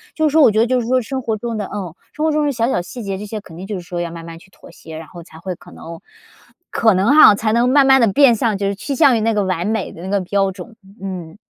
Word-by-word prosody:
就 315 -1 +1
是 - - -1
说 320 - +5
我 255 - +6
觉 215 - 0
得 230 - +3
就 255 +1 +1
是 230 - -6
说 255 +1 +2
生 260 +3 -5
活 225 -3 -2
中 230 +1 -5
的 205 - -3
嗯， 190 -6 -5 0.2
生 305 - -2
活 315 - +2
中 300 0 0
的 290 - +1
小 230 -3 -1
小 220 - 0
细 180 +7 -9
节， 195 -1 -4
这 205 - -7
些 215 +1 -6
肯 165 -5 -14
定 185 +2 -8
就 210 - -4
是 185 - -5
说 175 0 -5
要 170 -1 -4
慢 165 0 -9
慢 165 0 -10
去 195 - -20
妥 - - -17
协， 160 -1 -11
然 160 0 -10
后 170 +1 -12
才 160 -1 -15
会 185 +2 -5
可 - - -17
能 165 0 -10 0.7
可 220 -2 +2
能 195 +8 +2
哈， 260 -9 +8
才 215 +1 -1
能 240 +2 +2
慢 275 +1 +4
慢 265 0 +5
地 230 - +4
变 265 +1 +5
向 220 -2 -1
就 200 0 -2
是 200 - -2
趋 275 +8 -5
向 260 -1 +4
于 - - -2
那 225 +1 +1
个 210 -1 0
完 185 -1 -2
美 220 -2 -2
的 165 - -12
那 190 - -6
个 200 0 0
标 195 +1 0
准。 200 +5 -11 0.3
嗯。 185 -3 -7
205 Hz, 345 characters per minute, -18 LUFS, 185-240 Hz, 0.7 s, 哈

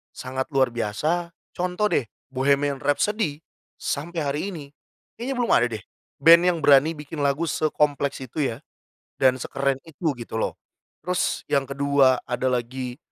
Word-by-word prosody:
sangat 130 +1 -4
luar 130 -2 +3
biasa. 155 +11 -2 0.2
Contoh 180 +4 -1
deh, 120 - +1 0.2
Bohemian 140 +1 +1
Rhapsody, 150 +2 0 0.3
sampai 165 +4 -3
hari 140 +1 -1
ini, 155 -5 -7 0.5
kayaknya 260 +3 -3
belum 245 -1 0
ada 120 - +5
deh, 105 - -8 0.4
band 170 +1 +9
yang 175 -2 +2
berani 145 +3 +5
bikin 150 +1 -8
lagu 140 +3 +1
sekompleks 145 -4 0
itu 135 +3 -2
ya, - - -12 0.7
dan 130 0 +5
sekeren 135 +2 -1
itu 160 0 -2
gitu 115 - -8
loh. 110 - -2 0.4
Terus 180 -1 -1
yang 140 -2 +2
kedua, 140 -1 +3
ada 125 +1 -2
lagi 125 +1 -3
140 Hz, 145 wpm, -24 LUFS, 130-165 Hz, 0.7 s, band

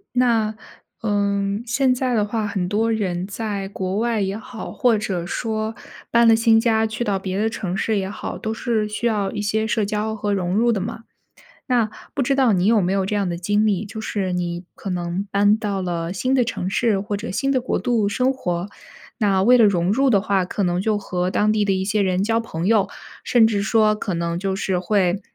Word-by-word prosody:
那， 225 -4 +2 0.5
呃， 205 -2 +1 0.3
现 255 +2 +2
在 255 -1 0
的 210 - +2
话， 215 0 -2
很 190 -3 -2
多 220 +4 +1
人 185 -5 -1
在 200 -1 -4
国 190 -1 -3
外 230 -1 0
也 195 0 -1
好， 225 +1 -8
或 240 -3 +2
者 190 -5 -3
说 220 +3 -3 0.3
搬 235 0 +4
了 225 - +7
新 225 0 +4
家 225 -1 +2
去 220 +2 -3
到 200 -4 0
别 190 0 -4
的 220 +2 +1
城 195 -5 -4
市 220 +1 0
也 190 0 -3
好， 205 - -6
都 220 - -3
是 225 -2 -1
需 210 +3 -4
要 205 -4 +1
一 205 - -4
些 220 +2 0
社 220 -2 +1
交 215 +1 -2
和 205 -1 -1
融 180 -2 -1
入 235 +3 +3
的 210 -4 -1
嘛。 230 +3 -5 0.7
那 235 -4 +2 0.2
不 - - 0
知 275 +2 +1
道 265 -4 +3
你 185 -1 +2
有 220 0 +4
没 185 0 0
有 195 -1 +1
这 210 - -1
样 200 -2 0
的 170 - -2
经 205 +4 +1
历， 205 -1 +1
就 220 +1 -7
是 200 -4 -2
你 175 0 -3
可 195 - -6
能 175 +2 -3
搬 205 +1 +4
到 205 -3 -2
了 170 -1 -3
新 255 +8 0
的 255 -2 +3
城 185 -5 -3
市 210 +1 +1
或 205 +1 -3
者 200 - -6
新 270 +9 -1
的 265 -2 +2
国 250 - -1
度 235 -5 +1
生 255 +5 +1
活， 180 -7 -3 0.5
那 200 -4 +2
为 250 +5 +6
了 230 - +6
融 180 -2 +2
入 270 +5 +3
的 200 -4 +4
话， 195 -2 +1
可 190 +3 -3
能 175 -1 +1
就 215 +2 +1
和 180 -2 -2
当 210 +2 +2
地 215 -1 +1
的 200 - +1
一 190 0 0
些 210 +2 0
人 185 -1 +1
交 225 +2 +1
朋 170 -7 -4
友， 215 -2 +3 0.4
甚 235 -3 +5
至 210 -3 0
说 215 +1 +3
可 205 -3 -3
能 170 0 -2
就 190 +1 -2
是 190 -1 -1
会 185 0 +1
210 Hz, 245 characters per minute, -22 LUFS, 190-225 Hz, 0.7 s, 了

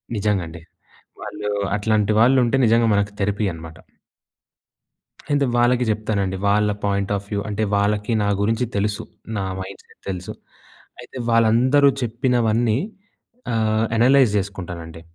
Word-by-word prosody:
నిజంగా 105 -3 0
అండి. 80 0 -10 0.6
వాళ్ళు 105 0 -5 0.3
అట్లాంటి 105 0 +1
వాళ్ళు 130 +4 +5
ఉంటే 135 +3 +1
నిజంగా 115 +1 +3
మనకు 100 0 +1
థెరపీ 105 +1 0
అనమాట. 80 0 -10 1.5
అయితే 145 -1 +2
వాళ్ళకి 120 +1 +3
చెప్తానండి 100 -3 -1
వాళ్ళ 105 +1 +2 0.2
పాయింట్ 100 0 -1
ఆఫ్ 100 - -5
వ్యూ 100 -2 -2
అంటే, 105 +1 -2
వాళ్ళకి 105 +2 0
నా - - 0
గురించి 115 +4 +1
తెలుసు. 105 +1 -1 0.3
నా 95 - -2 0.2
మైండ్‌సెట్ 95 +1 -10
తెలుసు. 90 -1 -5 0.7
అయితే 130 - -11
వాళ్ళందరూ 120 +5 +4
చెప్పినవన్నీ 115 -1 +1 0.7
ఆహ్, 110 0 +1
అనలైజ్ 125 0 +4
చేసుకుంటానండి. 90 -5 -6
105 Hz, 125 wpm, -21 LUFS, 100-115 Hz, 1.5 s, వాళ్ళు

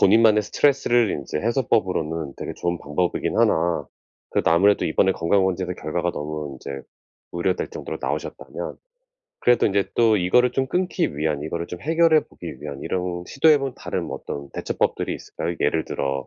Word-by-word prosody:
본인만의 110 +1 +6
스트레스를 120 -3 +2
인제 70 0 -4
해소법으로는 90 - 0
되게 - - -5
좋은 85 -1 -2
방법이긴 80 +5 -1
하나 80 -3 +2 0.5
그래도 - - +1
아무래도 100 +5 +4
이번에 95 +4 +3
건강검진에서 90 +1 +1
결과가 85 +3 -2
너무 75 -1 -5
인제 70 +1 -7 0.5
우려될 90 +1 -1
정도로 - - -6
나오셨다면 - - -4 0.6
그래도 120 -1 +4
인제 100 -1 0
또 115 -2 +4
이거를 125 +8 +3
좀 130 0 0
끊기 180 - -1
위한, 75 -1 -1
이거를 85 +2 -3
좀 90 - -8
해결해 160 0 +4
보기 - - -9
위한 70 -2 -6
이런 90 -1 -2
시도해 150 +2 +5
본 135 -1 -3
다른 - - -3
뭐 - - -5
어떤 70 -1 -6
대처법들이 - - -1
있을까요? 85 - -5
예를 80 +2 +1
들어 70 -1 -2
90 Hz, 405 characters per minute, -23 LUFS, 75-115 Hz, 0.6 s, 본인만의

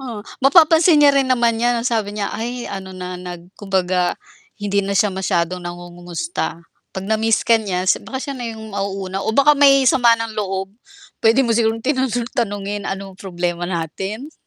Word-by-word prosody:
Oh, 235 -6 -7 0.2
mapapansin 320 +3 +6
niya 290 -1 +6
rin 270 -1 +2
naman 235 -2 +2
'yan, 240 0 +2
ang - - -6
sabi 210 -3 -2
niya, 205 -1 -2
"Ay 240 +2 -4
ano 190 -1 -7
na 180 0 -6
nag 175 0 -9
kumbaga 185 -2 0 0.4
hindi 200 -1 0
na 200 0 -2
siya 210 -1 +2
masyadong 185 -2 -1
nangungumusta." 175 -1 -5 0.3
'Pag 190 - -5
na-miss 220 +2 +1
ka 230 -1 +4
niya 185 -3 -2
si 185 - +2
baka 265 - -7
siya 280 - -4
na 245 - -6
yung 220 -1 -9
mauuna 195 -1 -3
o 220 - -1
baka 280 +2 +6
may 275 -2 +5
sama 240 -2 +5
ng 230 -1 -4
loob. 195 -1 -3 0.5
Puwede 230 +4 +4
mo 235 - +1
sigurong 225 0 0
tinano 260 -1 +1 0.2
tanungin, 205 -4 -3
anong 195 -1 -6
problema 175 -2 -3
natin? 190 - -4
205 Hz, 180 wpm, -19 LUFS, 185-240 Hz, 0.5 s, mapapansin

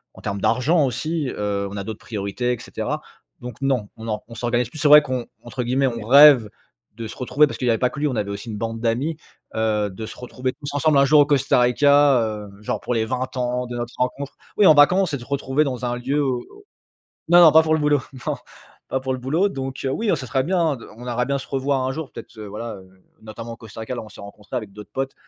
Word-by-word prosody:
en - - -13
termes 100 -1 -4
d'argent 155 +5 +2
aussi, 140 +4 -2
heu, 100 -2 -2
on 100 - -7
a 100 - -3
d'autres 110 +1 -7
priorités 110 +4 -3
et 120 - -6
cetera. - - -4 0.4
Donc, 125 -2 -8
non, 130 -7 0
on 110 0 -8
or 105 -1 -3
on 115 - -12
s'organise 120 0 -1
plus. 155 - -10
C'est 150 - +2
vrai 150 0 +9
qu'on 125 -3 -3 0.2
entre 125 +2 -5
guillemets, 130 +3 +1
«on 115 -3 -4
rêve» 140 -4 +8 0.5
de 115 0 -6
se - - -9
retrouver 145 +4 +3
parce - - -6
qu'il 125 - -3
y - - +4
avait 115 - +1
pas 125 - +2
que - - -8
lui. 150 - +1
On 130 - -2
avait 105 -2 -2
aussi 100 +4 -7
une 105 - -5
bande 115 +1 -4
d'amis. 125 +8 -1 0.4
Heu, 110 -2 0
de 100 +4 -7
se - - -10
retrouver 125 +1 -4
tous 145 -1 -8
ensemble 150 0 +3
un 140 - +5
jour 150 +2 +5
au - - +5
Costa 140 -3 +2
Rica, 140 +2 +5
heu, 105 -2 -4
genre 105 - -3
pour - - -3
les 115 -2 +1
20 130 +2 -3
ans 125 0 -1
de 120 - -6
notre 120 0 -5
rencontre. 135 +2 -3 0.2
Oui, 210 - +5
en - - +9
vacances 180 +5 +5
et 140 - 0
te 120 - -11
retrouver 140 +1 0
dans 125 -4 -3
un 120 0 -2
lieu, 140 +4 0
au 130 -3 -1 0.9
non, 175 +1 +7
non, 160 -3 +8
pas 160 - +7
pour 160 0 +1
le 160 - +1
boulot, 150 -2 +3 0.3
non, - - -1 0.5
pas 130 - -1
pour 130 0 -2
le 130 - -3
boulot. 155 +10 +1
Donc, 135 -3 -5
heu, 135 - 0
oui, 220 +11 -2
non, 180 - +3
ça 130 -3 -6
serait 130 +3 0
bien 165 -3 +1
de 115 - -12
on 120 +2 -10
aimerait 125 0 -1
bien 140 +1 0
se 135 - -9
revoir 135 0 0
un 130 - -1
jour. 155 0 -6
Peut-être, - - -11
heu, 105 - -7
voilà, 105 +2 -6
heu, 95 -1 -14 0.3
notamment 115 +2 -8
au - - -9
Costa 110 -1 -11
Rica, 110 +3 -4
là, 120 - -4
où - - -11
on - - -12
s'est - - -13
rencontré 105 +4 -9
avec 110 -5 -5
d'autres 105 0 -12
potes. 135 +2 -3
125 Hz, 270 wpm, -22 LUFS, 115-140 Hz, 0.9 s, vrai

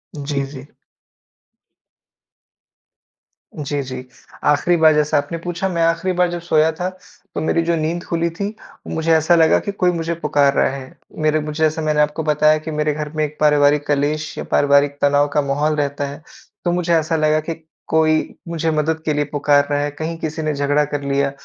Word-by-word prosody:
जी, 140 -1 -2
जी। 130 -1 -9 2.9
जी, 145 -1 -3
जी। 130 -1 -7 0.4
आख़िरी 150 +4 +3
बार 160 -1 +6
जैसा 150 0 +2
आपने 145 +4 -2
पूछा, 175 +2 -3
मैं 170 -2 -1
आख़िरी 165 +3 +1
बार 180 0 +3
जब 175 - -3
सोया 160 -2 +2
था, 180 +3 -3 0.5
तो - - -2
मेरी 165 +1 +1
जो 170 0 +1
नींद 165 +2 -2
खुली 170 0 -1
थी, 200 +6 -5 0.3
मुझे 160 0 -1
ऐसा 160 +2 +4
लगा 160 -1 +4
कि 200 - -4
कोई 185 -2 +1
मुझे 170 -1 -2
पुकार 145 -3 +2
रहा - - +2
है। 130 -1 -10 0.3
मेरे 155 0 +3
मुझे 150 +1 -3
जैसे 155 +1 +1
मैंने 155 -1 +1
आपको 150 +2 0
बताया 155 0 +3
कि 155 +1 -6
मेरे 150 0 0
घर 150 0 -4
में 155 - +1
एक 150 0 -9
पारिवारिक 145 -1 +3
कलेश 150 +1 -1
या - - -3
पारिवारिक 140 0 +3
तनाव 145 0 +3
का 150 - +3
माहौल 145 +2 0
रहता 145 -1 -2
है, 140 +2 -9 0.4
तो 175 - +2
मुझे 175 -1 0
ऐसा 160 0 +1
लगा 155 0 +2
कि - - 0 0.3
कोई 155 0 +1
मुझे 165 -1 -1
मदद 155 +1 -1
के 155 - +1
लिए 150 0 0
पुकार 145 -1 +2
रहा 145 - +1
है, 145 0 -1
कहीं 160 +3 -5
किसी 160 0 -4
ने 155 -1 -1
झगड़ा 145 +1 +1
कर 145 0 -4
लिया। 140 0 0
155 Hz, 195 wpm, -19 LUFS, 145-165 Hz, 2.9 s, बार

